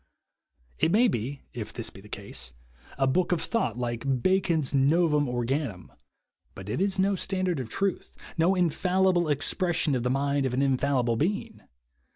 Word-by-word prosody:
It 165 Hz, -, +3 dB
may 235 Hz, +6 st, +5 dB
be 135 Hz, -, -3 dB
(if 115 Hz, -3 st, -5 dB
this 115 Hz, -, -3 dB
be 95 Hz, -, -13 dB
the 105 Hz, -, -15 dB
case) 65 Hz, -12 st, -5 dB, 0.4 s
a 135 Hz, -, +2 dB
book 175 Hz, +8 st, +1 dB
of 175 Hz, -, +2 dB
thought 230 Hz, -, -1 dB
like 125 Hz, +1 st, -2 dB
Bacon's 175 Hz, -7 st, +2 dB
No 150 Hz, +6 st, +4 dB
vum 150 Hz, -3 st, +1 dB
Organum, 120 Hz, -, -2 dB, 0.6 s
but 95 Hz, +1 st, -8 dB
it 110 Hz, -, -1 dB
is 195 Hz, -1 st, +1 dB
no 195 Hz, +1 st, +2 dB
standard 185 Hz, -3 st, -1 dB
of 125 Hz, -4 st, -5 dB
truth, 195 Hz, -, -2 dB, 0.2 s
no 170 Hz, +3 st, +3 dB
infalli 185 Hz, +1 st, +2 dB
ble 175 Hz, -3 st, +1 dB
expression 155 Hz, +2 st, +1 dB
of 125 Hz, -, 0 dB
the 125 Hz, -, 0 dB
mind 140 Hz, +1 st, +1 dB
of 125 Hz, -, -2 dB
an 135 Hz, -, +1 dB
infallible 130 Hz, -3 st, +1 dB
being 190 Hz, -, -2 dB
145 Hz, 175 wpm, -27 LUFS, 125-180 Hz, 0.6 s, may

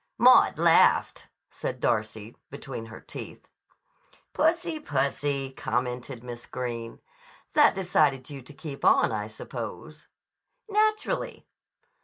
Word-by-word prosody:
"Maud -, -, +6 dB
laughed," -, -, +4 dB, 0.2 s
said -, -, -5 dB
Darcy 110 Hz, 0 st, -2 dB
between 135 Hz, -5 st, -7 dB
her 110 Hz, -, -10 dB
teeth. -, -, -10 dB, 0.9 s
"Pussy, 330 Hz, 0 st, +1 dB
pussy!" 140 Hz, -, -1 dB
commented 125 Hz, -1 st, -3 dB
Miss 120 Hz, -1 st, -8 dB
Greene. 120 Hz, -2 st, -5 dB, 0.5 s
"That 295 Hz, -7 st, +5 dB
decided 150 Hz, -8 st, +1 dB
you 140 Hz, -2 st, -8 dB
to 125 Hz, -, -14 dB
keep 145 Hz, -2 st, -8 dB
on, -, -, +5 dB
I 105 Hz, -1 st, -3 dB
suppose." 120 Hz, +7 st, -8 dB, 0.6 s
"Naturally." 430 Hz, 0 st, 0 dB
135 Hz, 105 wpm, -27 LUFS, 120-155 Hz, 0.9 s, Maud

